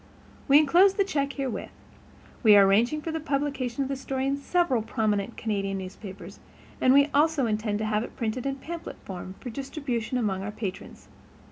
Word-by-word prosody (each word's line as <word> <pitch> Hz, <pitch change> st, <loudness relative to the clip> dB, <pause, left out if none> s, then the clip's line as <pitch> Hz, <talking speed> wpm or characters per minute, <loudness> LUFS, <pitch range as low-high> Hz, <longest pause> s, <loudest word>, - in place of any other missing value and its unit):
We 280 Hz, 0 st, +7 dB
enclose 350 Hz, +7 st, +5 dB
the 400 Hz, -, +3 dB
check 280 Hz, -7 st, -1 dB
herewith. 270 Hz, -4 st, -4 dB, 0.7 s
We 215 Hz, -4 st, +7 dB
are 200 Hz, -1 st, +8 dB
arranging 235 Hz, +10 st, +2 dB
for 325 Hz, -, -3 dB
the 320 Hz, -, -2 dB
publication 275 Hz, -4 st, -2 dB
of -, -, -3 dB
the 275 Hz, -, -2 dB
story 265 Hz, 0 st, -3 dB
in 275 Hz, +1 st, +1 dB
several 280 Hz, -3 st, +1 dB
prominent 215 Hz, -1 st, -1 dB
Canadian 195 Hz, -3 st, -2 dB
newspapers, 190 Hz, +1 st, -9 dB, 0.4 s
and 255 Hz, -, +5 dB
we 280 Hz, +2 st, +5 dB
also 300 Hz, -2 st, +3 dB
intend 215 Hz, -1 st, -1 dB
to 215 Hz, -, -2 dB
have 215 Hz, 0 st, 0 dB
it -, -, -9 dB
printed 235 Hz, +3 st, -2 dB
in 275 Hz, -, -1 dB
pamphlet 335 Hz, +5 st, -7 dB
form 185 Hz, 0 st, -7 dB
for 245 Hz, -, -7 dB
distribution 260 Hz, -2 st, -3 dB
among 200 Hz, -5 st, -1 dB
our 195 Hz, -, -4 dB
patrons. 205 Hz, -3 st, -7 dB
255 Hz, 180 wpm, -27 LUFS, 210-280 Hz, 0.7 s, are